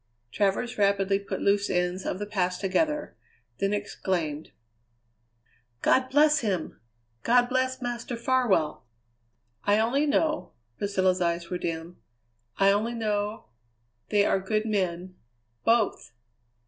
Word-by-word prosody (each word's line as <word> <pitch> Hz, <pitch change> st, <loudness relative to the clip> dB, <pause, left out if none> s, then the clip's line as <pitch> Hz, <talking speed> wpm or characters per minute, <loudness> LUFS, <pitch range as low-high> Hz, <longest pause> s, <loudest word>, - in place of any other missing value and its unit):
Travers 210 Hz, +4 st, 0 dB
rapidly 200 Hz, -1 st, +2 dB
put 200 Hz, -, -5 dB
loose 200 Hz, 0 st, +2 dB
ends 180 Hz, +1 st, -1 dB
of -, -, -2 dB
the 205 Hz, -, -4 dB
past 185 Hz, -3 st, -1 dB
together, 300 Hz, +11 st, 0 dB, 0.4 s
then 195 Hz, -, +1 dB
exclaimed: 175 Hz, -7 st, -2 dB, 1.3 s
"God 260 Hz, 0 st, +3 dB
bless 300 Hz, +2 st, +4 dB
him; 190 Hz, -8 st, -3 dB, 0.4 s
God 245 Hz, +1 st, +4 dB
bless 260 Hz, 0 st, -1 dB
Master 240 Hz, 0 st, -4 dB
Farwell!" 225 Hz, -, +1 dB, 0.8 s
"I 205 Hz, +1 st, +3 dB
only 255 Hz, +7 st, +2 dB
know" 310 Hz, +1 st, 0 dB, 0.3 s
Priscilla's 190 Hz, -2 st, +1 dB
eyes 170 Hz, 0 st, -1 dB
were 180 Hz, -, -2 dB
dim 165 Hz, +1 st, -5 dB, 0.6 s
"I 195 Hz, 0 st, +5 dB
only 220 Hz, +4 st, 0 dB
know 210 Hz, -, -2 dB, 0.6 s
they 205 Hz, -1 st, +3 dB
are 195 Hz, -, +2 dB
good 215 Hz, +3 st, -1 dB
men 185 Hz, -3 st, -2 dB, 0.5 s
both!" 225 Hz, -, +2 dB
205 Hz, 120 wpm, -27 LUFS, 185-240 Hz, 1.3 s, I